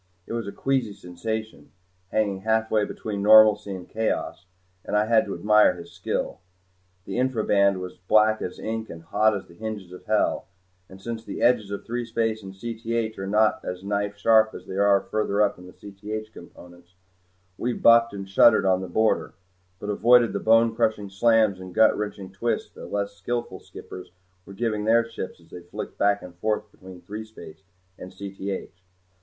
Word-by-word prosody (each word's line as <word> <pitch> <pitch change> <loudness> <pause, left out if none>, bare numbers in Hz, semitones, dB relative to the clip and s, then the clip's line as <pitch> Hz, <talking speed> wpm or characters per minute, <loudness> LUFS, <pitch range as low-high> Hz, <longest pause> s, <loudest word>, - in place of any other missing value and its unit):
It - - -7
was 115 -3 -3
a - - -4
queasy 130 -5 -1
sensation, 110 +5 -6 0.4
hanging 100 -3 0
halfway 110 0 +1
between 100 -1 -5
normalcy 105 -1 +6
and 90 -1 -9
chaos, 110 -4 -3 0.4
and 105 - -1
I 105 - +3
had 110 0 +3
to 100 - -5
admire 105 +1 +4
his 85 -1 -11
skill. - - -3 0.7
The 100 - -3
infra 130 -4 0
band 100 -2 +3
was 90 0 -8
black 110 0 +4
as 90 - -5
ink 110 0 -4
and 85 0 -9
hot 105 +4 +2
as 95 - -9
the 85 - -17
hinges 105 -2 -6
of 90 - -12
hell 110 -1 0 0.4
and 95 - -13
since 115 +2 -6
the - - -5
edges 120 -4 +3
of 100 - -6
threespace 115 -2 -2
and 95 -1 -10
Cth 115 +1 -3
are 95 - -4
not 105 +2 +2
as 90 +1 -6
knife 100 0 -2
sharp 110 +1 +4
as - - -10
they 95 - -7
are 100 0 +4
further 105 -1 -2
up 100 -3 -1
in 90 - -12
the - - -12
Cth 105 +3 -8
components, 90 0 -15 0.6
we 125 - 0
bucked 115 0 +5
and 100 -1 -7
shuddered 100 +2 +5
on 95 -1 +2
the 95 - -5
border, 110 +5 +1 0.4
but 105 - -4
avoided 120 +2 +4
the - - -1
bone 115 0 +4
crushing 110 -4 0
slams 110 -1 +3
and 95 -1 -10
gut 110 0 +5
wrenching 100 -2 -5
twists 115 +5 -2
that - - -10
less 100 0 -2
skillful 120 -1 -4
skippers 90 0 -11 0.4
were 100 - -10
giving 105 -1 -1
their 115 +1 +3
ships 105 -6 -7
as 85 -1 -23
they 90 - -9
flicked 85 +1 -8
back 100 0 +2
and 90 - -10
forth 105 0 -2
between 95 -2 -13
threespace 110 -5 -10 0.4
and 90 - -9
Cth. 100 -1 -6
105 Hz, 185 wpm, -25 LUFS, 95-110 Hz, 0.7 s, normalcy